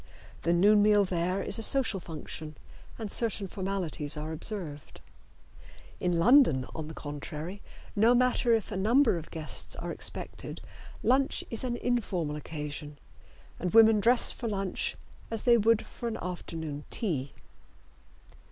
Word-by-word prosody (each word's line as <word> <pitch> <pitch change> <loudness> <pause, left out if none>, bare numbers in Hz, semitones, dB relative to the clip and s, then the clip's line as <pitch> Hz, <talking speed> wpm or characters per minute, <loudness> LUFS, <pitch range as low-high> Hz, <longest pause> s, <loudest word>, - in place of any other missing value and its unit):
The 170 - +1
noon 205 +5 +5
meal 205 -1 +5
there 180 +1 -1
is - - +1
a - - -3
social 225 -4 +2
function, 155 -2 -7 0.4
and 220 -3 -5
certain 220 -3 -1
formalities 185 -6 -3
are 155 +1 -4
observed. 160 -3 -5 1.0
In 180 -1 0
London, 170 - +5
on 160 -2 -5
the 160 - -9
contrary, 150 +6 -6 0.3
no 225 +4 +5
matter 250 -1 +2
if 225 -3 +1
a - - -3
number 230 +4 +4
of 165 - -11
guests 160 -2 -4
are - - -5
expected, - - -2 0.4
lunch 265 +3 +2
is 230 - 0
an 240 -2 -2
informal 185 -12 -1
occasion, 150 -1 -6 0.6
and 180 +4 -2
women 225 -1 +7
dress 235 +4 +5
for 235 - -5
lunch 195 -3 -2 0.3
as 225 -2 -4
they 240 -1 +6
would 225 0 +3
for 240 - -7
an 225 - -3
afternoon 160 -4 -5
tea. 145 - -1
195 Hz, 145 wpm, -29 LUFS, 160-225 Hz, 1.0 s, women